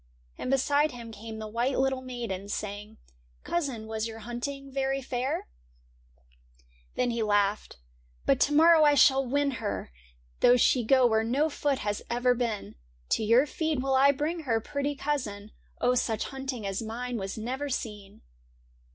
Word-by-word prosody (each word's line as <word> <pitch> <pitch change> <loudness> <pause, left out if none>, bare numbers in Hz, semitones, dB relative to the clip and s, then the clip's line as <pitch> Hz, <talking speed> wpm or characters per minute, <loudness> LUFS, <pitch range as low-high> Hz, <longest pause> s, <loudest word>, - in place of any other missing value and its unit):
And - - -5
beside 285 +2 +2
him 235 -2 -9
came 220 +1 -8
the 215 0 -6
white 240 +5 -1
little 265 0 +1
maiden. 235 -7 -5
Saying, 210 +1 -5 0.4
*■ - - -35
Cousin, 275 -10 -2
was 220 0 -3
your 225 0 -8
hunting 255 +5 -6
very 270 0 0
fair? 255 0 -2 0.7
' - - -33
Then 245 -1 +1
he 230 -1 -2
laughed. 205 - +1 0.2
' - - -35
But - - +3
to 290 - +3
morrow 325 +1 +7
I 295 -1 +5
shall 270 -1 +5
win 280 +2 +1
her, 205 - -4 0.5
Though 245 - +6
she 245 +1 +3
go 260 +2 +4
where 220 -2 +3
no 280 +7 +1
foot 285 -1 0
has 205 0 -1
ever 245 +1 +2
been. 235 -4 -3 0.4
To - - +1
your 230 +6 +5
feet 315 0 -2
will 270 +1 0
I 270 +2 +6
bring 305 +5 -2
her, 245 -8 0
pretty 285 +4 -3
cousin; 215 -8 -3 0.3
Oh, 245 - +3
such 225 -3 -1
hunting 265 -5 -5
as 195 +1 -2
mine 240 +2 -4
was 195 0 -5
never 260 +6 -3
seen 210 -6 -5
245 Hz, 170 wpm, -28 LUFS, 215-270 Hz, 0.7 s, morrow